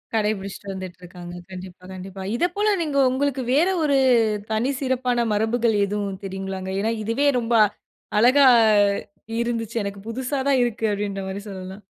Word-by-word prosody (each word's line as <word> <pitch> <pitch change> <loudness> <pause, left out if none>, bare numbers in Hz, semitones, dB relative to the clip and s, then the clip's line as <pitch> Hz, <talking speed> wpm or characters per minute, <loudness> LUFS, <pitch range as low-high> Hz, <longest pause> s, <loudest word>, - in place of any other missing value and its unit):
கடைபிடிச்சுட்டு 200 -2 -2
வந்துட்ருக்காங்க. 180 -1 -9 0.2
கண்டிப்பா 185 0 -10
கண்டிப்பா. 190 +1 -8
இத 340 - +2
போல 415 0 +2
நீங்க 295 -3 -1
உங்களுக்கு 270 0 0
வேற 330 +6 +4
ஒரு 280 -2 +3 0.5
தனி 220 +4 +1
சிறப்பான 250 -2 0
மரபுகள் 225 +2 +1
எதுவும் 200 -1 -3
தெரியுங்களாங்க? 190 0 -5
ஏன்னா 220 +3 0
இதுவே 230 +7 +1
ரொம்ப 235 0 0 0.6
அழகா 255 +5 +6 1.0
இருந்துச்சு. 230 -1 -3
எனக்கு 200 0 -6
புசுசா 260 +4 -3
தான் 270 - +4
இருக்கு. 230 -2 -2
அப்பிடீன்ற 200 -1 -3
மாரி 195 +1 -5
சொல்லலாம். 190 +1 -8
220 Hz, 135 wpm, -23 LUFS, 195-250 Hz, 1.0 s, அழகா